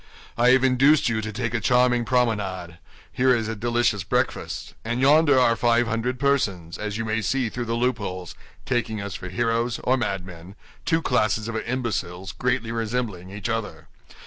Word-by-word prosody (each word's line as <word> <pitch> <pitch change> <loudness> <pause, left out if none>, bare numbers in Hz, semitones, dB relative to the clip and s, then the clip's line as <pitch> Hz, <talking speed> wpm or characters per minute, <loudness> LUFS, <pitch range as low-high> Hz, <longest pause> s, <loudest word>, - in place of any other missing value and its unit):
"I 120 +2 +4
have 130 0 +5
induced 135 +2 +4
you 110 -1 -1
to 110 0 -5
take 120 +1 -3
a 120 - +1
charming 125 +1 +3
promenade; 100 -9 -1 0.3
here 130 0 +3
is 115 -2 -2
a 110 - -3
delicious 120 -2 0
breakfast; - - -2
and 115 +2 -2
yonder 145 +1 +5
are 115 -2 +4
five 120 0 +2
hundred 115 +2 -2
persons, 100 -12 0
as 105 -1 -3
you 115 - -3
may 110 0 -1
see 125 +3 0
through 120 +2 -4
the 115 0 -2
loopholes, 105 -8 -2 0.3
taking 120 -4 -1
us 100 -1 -5
for 90 - -6
heroes 115 +4 0
or 130 +1 +2
madmen—two 95 - -4
classes 110 -3 +1
of 115 - -4
imbeciles 110 -7 -3
greatly 120 +1 -1
resembling 115 -5 -3
each 100 +4 -5
other." 115 -2 -4
115 Hz, 170 wpm, -24 LUFS, 105-125 Hz, 0.3 s, have